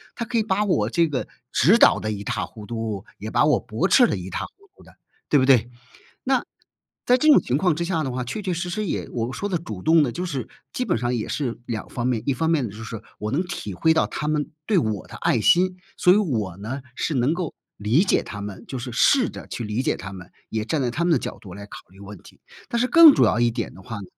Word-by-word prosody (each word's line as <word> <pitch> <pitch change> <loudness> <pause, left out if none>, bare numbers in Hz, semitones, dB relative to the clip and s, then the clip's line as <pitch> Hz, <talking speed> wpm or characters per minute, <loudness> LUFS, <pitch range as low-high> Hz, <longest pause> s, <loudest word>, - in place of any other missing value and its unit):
他 235 - -4
可 230 +1 0
以 - - +3
把 210 -1 0
我 110 - +1
这 165 +6 +2
个 140 -5 -3 0.2
指 185 - +5
导 - - +6
得 110 - -3
一塌糊涂， 105 +1 -4
也 - - -5
把 - - +3
我 - - +3
驳 - - -1
斥 - - +6
得 - - -1
一塌糊涂 370 - -8
的， - - -19 0.3
对 145 - +5
不 130 - +3
对？ 125 -3 +4 0.5
那， 265 -1 +1 0.6
在 250 - +5
这 310 - +1
种 295 - +7
情 125 - 0
况 170 0 +2
之 170 - -2
下 170 -2 -1
的 135 - -3
话， 125 0 -3
确 170 - -5
确 185 -2 -1
实 175 +2 -3
实 210 +4 -2
也 - - -3
我 120 +1 -3
说 205 - -3
的 180 - 0
主 110 - -8
动 160 - +5
呢， 130 - -1
就 175 - -4
是 140 -9 -4 0.2
基 250 - -2
本 - - +1
上 120 0 -1
也 110 - -3
是 130 -6 -3
两 115 -3 -5
方 120 - -4
面： 120 -4 0
一 140 - +3
方 160 +6 -1
面 155 -6 +2
呢 105 - -6
就 110 +2 -9
是， 110 -1 -7 0.2
我 105 +1 -3
能 145 +7 +1
体 170 - -6
会 160 - +2
到 160 - +2
他 150 - -4
们 150 -1 -1 0.2
对 210 - +3
我 110 - -1
的 - - -11
爱 - - +1
心， 185 +1 +3 0.2
所 180 - +5
以 - - +4
我 115 - -1
呢， 115 +8 -5
是 155 - -2
能 130 +4 +2
够 175 -3 -4 0.2
理 110 - +2
解 - - +2
他 105 - -8
们 100 -2 -7
就 130 - -5
是 125 +1 -6
试 255 - +4
着 - - -10
去 120 - -5
理 105 +3 -2
解 - - 0
他 95 +1 -8
们， 90 -2 -11 0.2
也 110 -1 -2
站 145 +7 -1
在 125 - 0
他 155 +8 -2
们 175 - +2
的 160 - +5
角 - - -6
度 95 -4 -11
来 100 0 -9
考 - - -10
虑 95 +1 -19
问 100 0 -10
题。 - - -18 0.3
但 235 - 0
是 250 - +2
更 330 -2 +9
主 - - +4
要 - - +2
一 120 0 +3
点 115 -1 -4
的 95 - -13
话 115 +4 -7
呢， 100 - -7
130 Hz, 300 characters per minute, -23 LUFS, 110-175 Hz, 0.6 s, 更